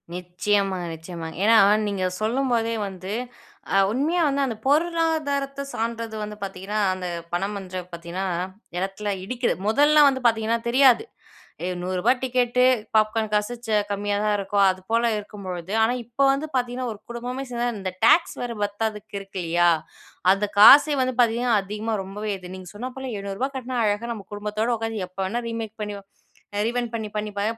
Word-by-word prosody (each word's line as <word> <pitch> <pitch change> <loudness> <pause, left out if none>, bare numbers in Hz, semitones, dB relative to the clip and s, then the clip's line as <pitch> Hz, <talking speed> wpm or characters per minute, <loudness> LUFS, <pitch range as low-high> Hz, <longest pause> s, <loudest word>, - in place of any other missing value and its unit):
நிச்சயமாங்க, 185 +1 -1
நிச்சயமா. 165 0 -7 0.2
ஏன்னா 225 +2 +6 0.3
நீங்க 200 -2 -2 0.2
சொல்லும்போதே 230 0 +1
வந்து 190 +1 -6 0.6
அ - - +5
உண்மையா 295 +9 +1
வந்து 280 0 0
அந்த 245 -4 -1
பொருளாதாரத்தை 295 -3 +1
சார்ந்தது 230 0 -3
வந்து 210 0 -5
பாத்தீங்கன்னா, 195 +2 -4
அந்த 185 -1 -4 0.3
படம்ன்றத 190 0 -3
பாத்தீங்கன்னா 170 +2 -5 0.5
இடத்தில 195 +3 -2
இடிக்குது. 245 +4 0
முதல்லலாம் 290 +6 +6
வந்து 265 -1 -3
பாத்தீங்கன்னா 225 0 +1
தெரியாது. 260 - +5 0.6
அ - - -1 0.2
ரூ.100 185 +4 +2
டிக்கெட்டு, 250 -1 +2 0.3
பாப்கார்ன் 215 0 +1
காசு 210 +3 0
ச 215 -1 +3
கம்மியா 205 0 -1
தான் 210 -1 +2
இருக்கும். 200 0 +2
அதுபோல 190 +6 -1
இருக்கும்பொழுது, 190 -4 -7
ஆனா, 235 +3 +2
இப்போ 240 +4 -1
வந்து 285 +3 -3
பாத்தீங்கன்னா, 245 0 -1
ஒரு 200 - -14
குடும்பமே 250 +3 -4
சேந்தா, 240 0 -1
இந்த 190 -1 -3
டாக்ஸ் 340 - +5
வேற 245 - -3
பத்தாதுக்கு 210 0 -3
இருக்கு 195 -1 -7
இல்லையா? 175 +1 +4 0.6
அந்த 195 +1 -1
காசே 285 +7 +9
வந்து 255 -1 -2
பாத்தீங்கன்னா, 235 0 +2
அதிகமா 210 +3 -3
ரொம்பவே 205 +2 -5
இது. 185 0 -10
நீங்க 185 -1 -10
சொன்னா 245 +5 -4
போல 265 -1 -5
ரூ.700 200 +6 -3
கட்னா, 255 0 -4
அழகா 210 +3 -1
நம்ம 205 -3 -9
குடும்பத்தோட 210 +2 -2
உக்காந்தி, 225 -3 -3
எப்போ 185 - -14
வேணா 230 +6 -2
ரீமேக் 225 -2 -5
பண்ணி, 210 -1 -3 0.6
அ - - +1
ரீவைண்ட் 240 0 -2
பண்ணி, 220 -2 -3
பண்ணி, 210 0 -2
இப்ப 200 0 -2
215 Hz, 155 wpm, -24 LUFS, 195-245 Hz, 0.6 s, காசே